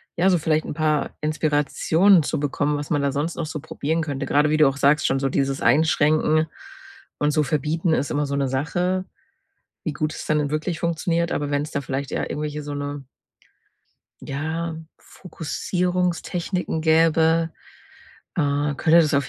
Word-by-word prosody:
ja, 180 +3 +3
so 180 - +4
vielleicht 155 -1 +1
'n - - -6
paar 155 -2 +1
Inspirationen 155 +4 +3
zu 155 0 -2
bekommen, 145 +1 0
was 145 +2 -6
man 145 -2 +2
da 140 -1 +1
sonst 150 +4 -2
noch 165 - -3
so 155 0 -5
probieren 160 +3 -2
könnte. 140 -3 -4
Gerade 150 +1 +3
wie 155 - +3
du 150 -2 +6
auch 135 - -5
sagst, 145 +2 +3
schon 135 - +1
so 135 - 0
dieses 135 0 0
Einschränken 155 +3 +3 0.7
und 150 0 +2
so 155 - +2
Verbieten 155 +3 0
ist 140 - 0
immer 145 0 0
so 140 - -2
'ne 140 -1 0
Sache, 175 +8 -1 0.8
wie 155 - -2
gut 155 +2 -2
es - - -7
dann 155 0 +2
in 145 -1 -2
wirklich 155 +2 -2
funktioniert. 170 0 0
Aber 145 -1 -2
wenn's 145 +1 -1
da 140 - -2
vielleicht 135 0 -4
eher - - -2
irgendwelche, 150 0 -3
so 145 - -6
'ne 145 0 -5 1.2
ja, 160 +4 -3 0.2
Fokussierungstechniken 180 0 -2
gäbe, 160 +1 +3 0.8
äh, 145 -3 0
könnte 160 +4 +5
das 155 -3 +1
auf 140 -1 +1
155 Hz, 170 wpm, -23 LUFS, 145-165 Hz, 1.2 s, du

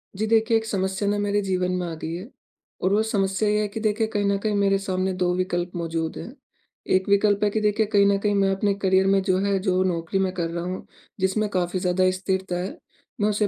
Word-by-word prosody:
जी, 215 +3 -1
देखिए 225 +1 +3
एक 220 - -3
समस्या 190 -1 -1
ना 205 - +1
मेरे 205 0 +1
जीवन 185 -2 -1
में 180 - -2
आ 165 - -5
गई 160 +1 -5
है 185 +5 -7 0.5
और 185 - +2
वो 210 - +3
समस्या 205 -1 0
ये 210 0 +2
है 210 - 0
कि 205 +2 -6
देखिए 215 0 0
कहीं 205 -2 -1
न 200 0 +2
कहीं 210 0 -1
मेरे 200 -1 +3
सामने 190 -1 -1
2 180 -1 0
विकल्प 180 -1 -1
मौजूद 165 -1 -3
हैं। 240 - -8 0.6
1 190 0 +1
विकल्प 200 0 +3
है 210 - +4
कि 220 - 0
देखिए 210 +1 +2
कहीं 205 -1 +3
न 200 0 +3
कहीं 205 +1 0
मैं 195 -1 +3
अपने 200 +1 +1
करियर 190 0 +3
में 195 0 +3
जो 190 -1 +1
है, 200 0 +1
जो 185 -1 +1
नौकरी 175 0 -1
मैं 190 -1 0
कर 170 -3 -2
रहा 170 +1 -4
हूँ, 185 +1 -5 0.3
जिसमें 190 +3 +1
काफ़ी 185 -1 -1
ज़्यादा 180 +1 +2
स्थिरता 190 -1 -2
है, 185 +3 -5 0.4
मैं 210 - +3
उसे 210 0 +1
195 Hz, 240 wpm, -24 LUFS, 185-205 Hz, 0.6 s, है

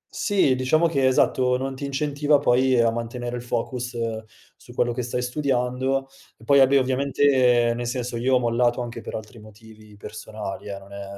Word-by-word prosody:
Sì, 195 -10 +2
diciamo 130 +6 +2
che 135 -5 +1
esatto, 125 -1 +2
non 135 +1 -4
ti 140 +2 -6
incentiva 145 +1 +1
poi 130 -1 +2
a 115 -1 +3
mantenere 120 +1 -5
il 120 - -5
focus 120 0 -4 0.6
su - - -16
quello 120 0 +1
che 125 - -3
stai 125 +1 -3
studiando, 130 0 -1 0.3
e - - -19
poi, 140 +4 +4
vabbè 135 +1 +5
ovviamente, 130 -2 +2
nel 120 0 -4
senso, 125 -1 -3
io 130 +2 +2
ho - - +4
mollato 120 0 +1
anche 120 -1 -7
per - - -7
altri 110 +1 -9
motivi 110 0 -16
personali 105 -1 -8
eh, 100 -1 -5
non 100 0 -14
è 100 0 -7
125 Hz, 185 wpm, -23 LUFS, 115-135 Hz, 0.6 s, vabbè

